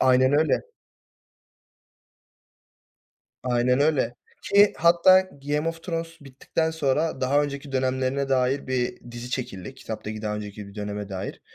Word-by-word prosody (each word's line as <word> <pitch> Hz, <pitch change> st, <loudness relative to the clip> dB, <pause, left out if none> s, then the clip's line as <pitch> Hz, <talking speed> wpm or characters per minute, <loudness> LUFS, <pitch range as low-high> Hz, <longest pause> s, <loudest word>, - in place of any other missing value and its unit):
Aynen 130 Hz, +1 st, +4 dB
öyle. 155 Hz, +2 st, +3 dB, 2.8 s
Aynen 125 Hz, +1 st, +2 dB
öyle 145 Hz, -5 st, +2 dB, 0.3 s
ki, 205 Hz, +1 st, +5 dB
hatta 175 Hz, +3 st, +6 dB
Game 150 Hz, -3 st, -3 dB
of 165 Hz, 0 st, -6 dB
Thrones 165 Hz, -1 st, -4 dB
bittikten 140 Hz, +4 st, -2 dB
sonra 155 Hz, -1 st, 0 dB
daha 140 Hz, +3 st, +3 dB
önceki 140 Hz, -1 st, -5 dB
dönemlerine 130 Hz, +1 st, 0 dB
dair 130 Hz, +1 st, +1 dB
bir 130 Hz, -2 st, -1 dB
dizi 120 Hz, +1 st, -7 dB
çekildi. 125 Hz, -2 st, -5 dB
Kitaptaki 110 Hz, -3 st, -6 dB
daha 105 Hz, -1 st, -2 dB
önceki 105 Hz, 0 st, -7 dB
bir 100 Hz, -, -14 dB
döneme 105 Hz, -1 st, -5 dB
dair. 95 Hz, 0 st, -5 dB
130 Hz, 125 wpm, -25 LUFS, 120-150 Hz, 2.8 s, hatta